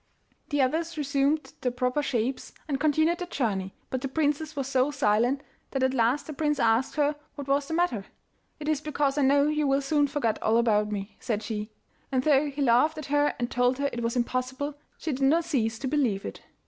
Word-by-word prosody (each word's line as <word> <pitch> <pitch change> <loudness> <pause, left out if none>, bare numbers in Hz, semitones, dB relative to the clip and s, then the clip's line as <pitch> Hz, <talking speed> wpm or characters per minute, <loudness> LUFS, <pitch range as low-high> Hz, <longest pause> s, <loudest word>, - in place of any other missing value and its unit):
The 290 -3 +2
others 325 +5 -1
resumed 285 +1 0
their 250 - 0
proper 250 +3 0
shapes 255 -1 -2
and 275 -3 -1
continued 315 +3 +2
their 360 - -4
journey, 195 - -2 0.2
but 260 - -2
the 270 - -2
princess 300 +2 -1
was 275 -2 -2
so 265 0 +2
silent 255 0 +1 0.3
that 270 -1 -1
at 260 0 +2
last 245 +3 +2
the 310 - -6
prince 295 0 0
asked 230 +2 +2
her 295 0 +2 0.2
what 285 -2 -7
was 280 +1 +1
the 320 - -2
matter. 290 - 0 0.5
'It 300 - -6
is 305 -2 +1
because 290 -2 0
I - - +3
know 280 +1 +4
you 300 -1 +1
will 275 +1 +2
soon 290 +1 +2
forget 265 -6 -1
all 220 +1 +3
about 210 -3 +2
me,' 200 0 -5
said 220 -4 -2
she, 215 -1 -4 0.4
and 260 -1 +1
though 290 0 +3
he 280 0 -2
laughed 270 +6 +4
at 305 - -5
her 290 0 +3
and 240 0 -2
told 245 +1 +2
her 280 0 0
it 240 - -3
was 230 +1 -1
impossible, 255 +4 -1 0.2
she 315 - -3
did 270 0 -4
not 315 +5 +3
cease 225 -9 0
to 265 - -4
believe 255 -9 0
it. - - -7
275 Hz, 215 wpm, -27 LUFS, 245-295 Hz, 0.5 s, know